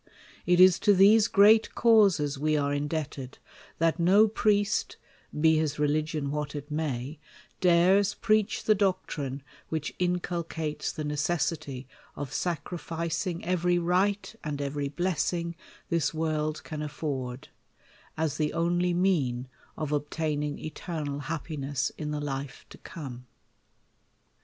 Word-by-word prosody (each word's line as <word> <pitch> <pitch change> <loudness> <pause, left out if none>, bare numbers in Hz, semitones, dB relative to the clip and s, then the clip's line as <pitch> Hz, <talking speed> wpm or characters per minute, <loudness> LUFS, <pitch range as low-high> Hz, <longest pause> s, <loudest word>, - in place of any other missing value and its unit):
)tis 180 0 +6
to 205 +2 +4
these 205 +3 +6
great 215 +2 +5
causes 195 - +4
we 155 +1 +1
are 145 -1 0
indebted, 145 -2 -4 0.4
that 165 +1 +1
no 195 +6 +5
priest, 210 0 +1 0.4
be 160 0 +5
his 155 -2 -1
religion 150 -1 0
what 150 0 -3
it 145 +1 -7
may, 150 -2 -3 0.4
dares 185 +3 +4
preach 215 -1 +1
the 215 - +4
doctrine 180 -9 -2 0.3
which 155 -2 -3
inculcates 170 -3 -2
the 155 - -5
necessity 150 -3 -2 0.3
of 145 -2 -6
sacrificing 170 0 -3
every 180 0 +1
right 190 +5 0
and 150 -2 -4
every 140 0 -2
blessing 170 +1 -1 0.3
this 165 -3 0
world 155 -1 -1
can 155 -2 -6
afford, 135 -4 -4 0.7
as 160 -2 -1
the 150 -1 0
only 175 +1 +1
mean 140 -10 +1 0.3
of 155 -2 -3
obtaining 150 0 -2
eternal 155 -3 -5
hap 155 +1 -4
piness 145 -3 -2
in 150 -1 -5
the 150 0 -2
life 140 -2 -5
to - - -12
come. 130 -7 -9
160 Hz, 125 wpm, -28 LUFS, 145-180 Hz, 0.7 s, tis